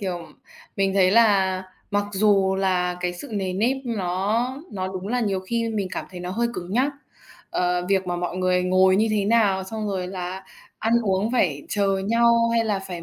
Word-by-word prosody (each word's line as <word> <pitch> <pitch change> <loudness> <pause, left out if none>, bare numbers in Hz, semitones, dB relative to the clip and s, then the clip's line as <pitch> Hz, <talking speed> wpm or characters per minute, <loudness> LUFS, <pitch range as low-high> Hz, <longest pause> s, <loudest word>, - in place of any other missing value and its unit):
Kiểu, 175 -4 -4 0.5
mình 195 -1 +1
thấy 185 -2 +4
là 195 -4 +3 0.3
mặc 205 0 +1
dù 195 -1 +3
là 180 -2 0
cái 180 0 -1
sự 220 +11 -9
nề 190 -3 -2
nếp 230 +8 +1
nó 215 +3 -1 0.2
nó 185 -2 -3
đúng 190 +1 -6
là 245 +2 0
nhiều 195 -4 0
khi 230 +4 -2
mình 205 -4 -2
cảm - - -3
thấy 180 -1 -8
nó 180 - -5
hơi 235 +5 0
cứng 180 +1 -6
nhắc, 265 +6 +2 0.6
ờ, 180 0 0
việc 190 -2 +1
mà 175 - -2
mọi 175 0 -3
người 185 0 +1
ngồi 185 +1 +4
như 220 +2 +3
thế 210 -2 +1
nào, 200 -3 +2
xong 215 +2 -5
rồi 185 -2 -2
là 185 0 -5 0.3
ăn 225 +1 0
uống 205 +3 0
phải 155 - +1
chờ 195 -2 +1
nhau 235 0 +4
hay 230 -1 +2
là 210 -3 0
phải 180 -3 -7
195 Hz, 205 wpm, -23 LUFS, 185-220 Hz, 0.6 s, thấy